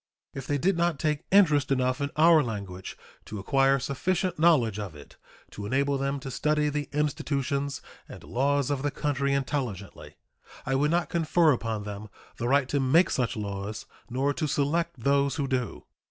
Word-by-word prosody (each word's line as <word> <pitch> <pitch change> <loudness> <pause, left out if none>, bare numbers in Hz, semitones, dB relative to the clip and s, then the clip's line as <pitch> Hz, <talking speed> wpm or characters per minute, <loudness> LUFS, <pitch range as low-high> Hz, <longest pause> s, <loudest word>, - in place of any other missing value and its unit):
If 135 -1 -7
they 145 - +1
did 180 +5 +1
not 170 -3 +1
take 150 +2 -1
interest 150 -9 +4
enough 130 +1 +1
in 140 - -1
our 160 0 +6
language 100 -7 -6 0.3
to 110 - -7
acquire 135 +6 +3
sufficient 175 +6 -1
knowledge 130 - +3
of 100 -7 -6
it 75 - -14 0.4
to 100 0 -7
enable 140 +3 +1
them 140 +1 -1
to 135 -1 -6
study 150 +3 +1
the 145 -1 -3
institutions 140 -1 -2 0.3
and - - -10
laws 140 +2 0
of 140 -2 -1
the 145 - 0
country 140 -1 -1
intelligently, 130 - -3 0.5
I 135 - -1
would 145 +3 +2
not 170 +2 0
confer 165 -1 +3
upon 115 -4 -2
them 105 +1 -7 0.3
the 120 - -2
right 140 0 +3
to 145 - +1
make 155 +7 +4
such 125 -3 -1
laws 100 0 -5 0.2
nor 135 +3 0
to 155 0 -2
select 160 +3 -1
those 140 +2 +2
who 140 -3 -1
do. 125 -4 -3
140 Hz, 175 wpm, -27 LUFS, 125-150 Hz, 0.5 s, our